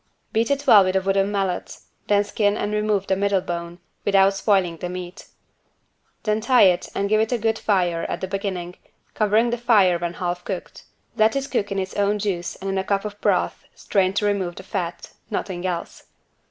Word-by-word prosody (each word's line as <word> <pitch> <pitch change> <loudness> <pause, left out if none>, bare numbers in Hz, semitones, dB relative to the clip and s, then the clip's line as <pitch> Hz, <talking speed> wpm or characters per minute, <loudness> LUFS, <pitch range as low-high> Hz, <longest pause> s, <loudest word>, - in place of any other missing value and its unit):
Beat 225 +1 +1
it 280 0 0
well 210 -7 +8
with 185 0 -1
a 190 - +3
wooden 195 +1 +1
mallet, 195 -3 -2 0.3
then 205 0 +3
skin 205 0 0
and 205 +1 -2
remove 210 -2 0
the 190 - +1
middle 200 0 +1
bone, 170 -1 -5 0.3
without 195 -1 +4
spoiling 195 -4 +1
the 180 - -5
meat. 180 0 -8 1.0
Then 215 0 0
tie 250 +2 +5
it 180 -2 +3
and 200 - 0
give 215 +1 +3
it 220 - -1
a 245 - +2
good 225 0 0
fire 175 -5 +1
at - - -3
the 190 - -4
beginning, 185 -2 -4 0.4
covering 220 +2 +2
the 240 - -2
fire 200 -7 +4
when 175 0 -3
half 175 0 -3
cooked. 185 -2 -6 0.3
Let 220 +2 +3
it 275 0 -2
cook 205 -6 -1
in 195 - -2
its 190 -1 -3
own 205 +1 +1
juice 195 -4 -3
and 195 - -8
in 195 0 0
a - - -1
cup 200 +1 -1
of 205 0 -7
broth - - 0
strained 190 -1 0
to 210 - +1
remove 190 -4 -1
the 190 - -9
fat; 180 -3 -5 0.2
nothing 185 -1 -3
else. 175 -2 -5
195 Hz, 205 wpm, -23 LUFS, 185-210 Hz, 1.0 s, well